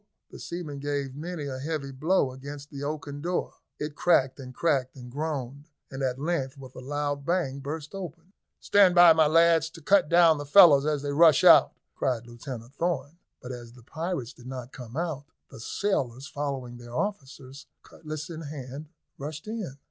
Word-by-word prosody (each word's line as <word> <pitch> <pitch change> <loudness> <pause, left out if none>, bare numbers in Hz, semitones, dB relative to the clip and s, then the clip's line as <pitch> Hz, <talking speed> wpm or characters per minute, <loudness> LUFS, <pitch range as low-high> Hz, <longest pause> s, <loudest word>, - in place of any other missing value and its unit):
the - - -10
seamen 165 -5 -6
gave 140 -2 -3
many 160 0 -5
a 130 -2 -5
heavy 145 -1 -4
blow 145 +1 +1
against 140 +2 -9
the 140 -1 -7
oaken 145 -1 -5
door. 175 +3 -2 0.2
It 150 0 -4
cracked 135 -6 +2
and 130 -1 -8
cracked 130 -2 0
and 125 -2 -10
groaned, 145 0 -4 0.2
and 135 0 -6
at 130 -1 -1
length, 145 -3 -2
with 130 -2 -11
a - - -9
loud 145 +1 -3
bang, 155 -4 -1
burst 150 +3 -6
open. 175 -1 -8 0.3
"Stand 195 -3 +4
by, 175 -2 +9
my 160 -1 +4
lads, 165 0 +4
to 165 - -13
cut 185 +1 +3
down 170 -3 +5
the 145 - -5
fellows 150 -4 +7
as 150 -2 0
they 145 - -2
rush 155 -1 +6
out," - - +7 0.2
cried 125 -3 -1
Lieutenant 120 0 -9
Thorn; 165 -1 -2 0.2
but 125 - -6
as 120 -2 -9
the 125 -1 -16
pirates 160 -3 -4
did 125 - -14
not 130 -1 -7
come 125 +1 -9
out, 160 -5 -3 0.3
the - - -11
sailors, 130 - -2
following 135 -4 -4
their 120 0 -10
officers, 140 -8 -5 0.2
cutlass 155 -1 -7
in 165 -1 -7
hand, 145 -1 -8 0.3
rushed 150 +5 -7
in. 210 -11 -5
145 Hz, 180 wpm, -27 LUFS, 130-165 Hz, 0.3 s, by